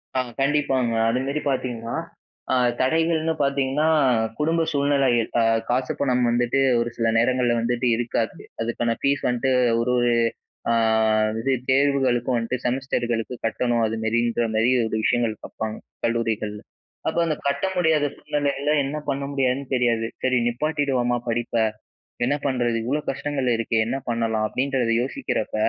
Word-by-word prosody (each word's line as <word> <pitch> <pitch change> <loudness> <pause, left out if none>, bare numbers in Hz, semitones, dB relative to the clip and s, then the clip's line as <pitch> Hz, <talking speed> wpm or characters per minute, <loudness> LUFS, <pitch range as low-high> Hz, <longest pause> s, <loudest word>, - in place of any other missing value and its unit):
ஆ - - +2 0.2
கண்டிப்பாங்க. 135 -4 +1 0.2
அதுமேரி 135 +5 -1
பார்த்தீங்கன்னா, 120 -3 -3 0.6
அ - - +4 0.3
தடைகள்னு 160 +3 +1
பார்த்தீங்கன்னா, 140 +2 +1 0.5
குடும்ப 160 +2 +1
சூழ்நிலைகள் 140 -5 +2
அ - - +3 0.3
காசு, 130 +1 0
பணம் 125 -3 +2
வந்துட்டு 120 +2 +1 0.2
ஒரு 120 0 0
சில 115 - +1
நேரங்கள்ல 120 0 +2
வந்துட்டு 120 +1 0
இருக்காது. 115 -1 -2 0.3
அதுக்கான 115 0 -1
ஃபீஸ் 140 0 +1
வந்துட்டு 125 +2 +1 0.3
ஒரு 125 +1 +1 0.8
அ - - +3 0.7
இது 135 - 0 0.2
தேர்வுகளுக்கும் 130 -3 +2
வந்துட்டு 120 +2 -3
செமஸ்டர்களுக்கு 120 -2 -1
கட்டணும், 120 +1 +1
அதுமாரின்றமாரி 115 +1 0 0.2
ஒரு - - -3
விஷயங்கள் 115 -2 +1
பார்ப்பாங்க, 110 0 -5 0.3
கல்லூரிகள்ல. 110 -3 -1 0.5
அப்போ - - 0
அந்த 155 -2 0
கட்ட 140 +4 0
முடியாத 160 -4 +3
சூழ்நிலைகள்ல, 145 0 -1
என்ன 140 +3 -3
பண்ண 140 0 -1
முடியாதுன்னு 135 0 0
தெரியாது. 120 -2 +1 0.2
"சரி 130 -1 +2
நிப்பாட்டிடுவோமா, 130 -2 0
படிப்ப. 120 0 -2 0.7
என்ன 140 +4 +1
பண்ணுறது, 120 -4 +1
இவ்ளோ 145 +5 0
கஷ்டங்கள் 135 -1 -3
இருக்கே. 115 0 0
என்ன 130 - -1
பண்ணலாம்?" 115 -2 0
அப்பிடின்றத 130 -1 0
யோசிக்கிறப்ப, 135 - -3
125 Hz, 125 wpm, -23 LUFS, 115-140 Hz, 0.8 s, அ